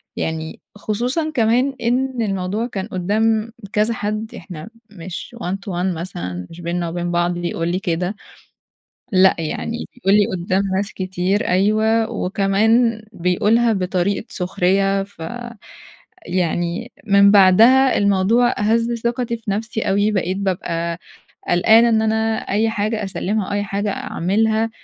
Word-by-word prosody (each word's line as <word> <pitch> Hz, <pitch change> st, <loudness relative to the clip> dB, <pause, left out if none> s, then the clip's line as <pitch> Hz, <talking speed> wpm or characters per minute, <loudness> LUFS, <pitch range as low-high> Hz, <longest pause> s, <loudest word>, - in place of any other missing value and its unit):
يعني 160 Hz, 0 st, -4 dB
خصوصًا 245 Hz, +10 st, -2 dB
كمان 250 Hz, +3 st, +2 dB
إن 250 Hz, +1 st, 0 dB
الموضوع 200 Hz, +2 st, -2 dB
كان 200 Hz, -4 st, -5 dB
قدّام 220 Hz, +4 st, 0 dB, 0.2 s
كذا 215 Hz, +2 st, +2 dB
حد، 215 Hz, +1 st, -3 dB
إحنا 170 Hz, +3 st, -9 dB, 0.2 s
مش 185 Hz, +4 st, -8 dB
one 180 Hz, +2 st, -2 dB
to 195 Hz, -1 st, -7 dB
one 180 Hz, 0 st, -1 dB
مثلًا، 90 Hz, -, -6 dB
مش 170 Hz, +1 st, -11 dB
بيننا 170 Hz, 0 st, -2 dB
وبين 175 Hz, +1 st, -3 dB
بعض 175 Hz, 0 st, +1 dB
بيقول 170 Hz, -1 st, -3 dB
لي 185 Hz, -, -1 dB
كده، 180 Hz, +1 st, -2 dB, 1.0 s
لأ 190 Hz, 0 st, +5 dB
يعني 225 Hz, +9 st, -4 dB
بيقول 200 Hz, -6 st, +1 dB
لي 205 Hz, -, +4 dB
قدّام 185 Hz, +3 st, 0 dB
ناس 200 Hz, +2 st, -2 dB
كتير، 185 Hz, +1 st, -1 dB
أيوه 215 Hz, +4 st, +2 dB
وكمان 220 Hz, +4 st, +1 dB
بيقولها 210 Hz, +7 st, +2 dB
بطريقة 190 Hz, +2 st, -1 dB
سخرية، 195 Hz, +2 st, +1 dB
ف 195 Hz, -4 st, -16 dB, 1.1 s
يعني 175 Hz, +5 st, -1 dB, 0.2 s
من 200 Hz, 0 st, +6 dB
بعدها 225 Hz, +7 st, +6 dB
الموضوع 205 Hz, +5 st, +3 dB
هزّ 230 Hz, +3 st, +1 dB
ثِقتي 235 Hz, 0 st, -1 dB
في 215 Hz, -3 st, -5 dB
نفسي 220 Hz, +2 st, -2 dB
أوي، 205 Hz, +2 st, +1 dB
بقيت 190 Hz, -1 st, -1 dB
بابقى 170 Hz, -3 st, -2 dB, 0.5 s
قلقانة 220 Hz, +6 st, +5 dB
إن 220 Hz, -1 st, +2 dB
أنا 220 Hz, 0 st, +1 dB
أي 220 Hz, +3 st, +2 dB
حاجة 215 Hz, 0 st, -2 dB
أسلِّمها 195 Hz, +2 st, -2 dB
أو -, -, -4 dB
أي 205 Hz, 0 st, 0 dB
حاجة 200 Hz, +1 st, -2 dB
أعملها، 220 Hz, +5 st, 0 dB
200 Hz, 135 wpm, -20 LUFS, 180-225 Hz, 1.1 s, من